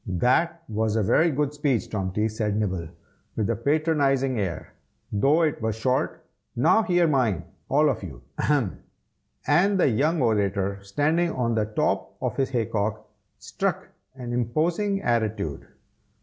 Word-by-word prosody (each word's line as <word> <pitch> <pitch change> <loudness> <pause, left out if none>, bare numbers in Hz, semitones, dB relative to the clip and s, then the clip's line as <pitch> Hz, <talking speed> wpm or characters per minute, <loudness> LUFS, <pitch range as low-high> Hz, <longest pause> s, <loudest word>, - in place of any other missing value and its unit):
"That 130 - +1
was 110 -1 -1
a 110 - +2
very 160 - +3
good 145 -1 -1
speech, 145 -5 0
Tomty," 105 +1 -1
said 105 -1 -2
Nibble, 95 -6 -2 0.5
with 110 0 0
a - - 0
patronizing 140 -3 +1
air, 95 -5 -4 0.4
"though 140 +11 +3
it 150 -6 0
was 110 -1 -1
short. 125 +3 -1 0.3
Now 170 - +4
hear 175 -5 +2
mine, 125 - +1 0.3
all 150 +3 +4
of 135 - 0
you. 70 -11 -9 0.2
Ahem!" 140 -10 +1 0.7
and 190 +6 +3
the 160 - +4
young 150 +8 +1
orator, 100 -4 0
standing 155 - +1
on 120 -4 -1
the 110 -1 +1
top 105 - -1
of - - -2
his 135 - 0
hay 120 -4 0
cock, 105 +1 -2 0.3
struck - - -3 0.3
an 120 -2 -6
imposing 170 - 0
attitude. 110 - -1
120 Hz, 150 wpm, -25 LUFS, 105-150 Hz, 0.7 s, Now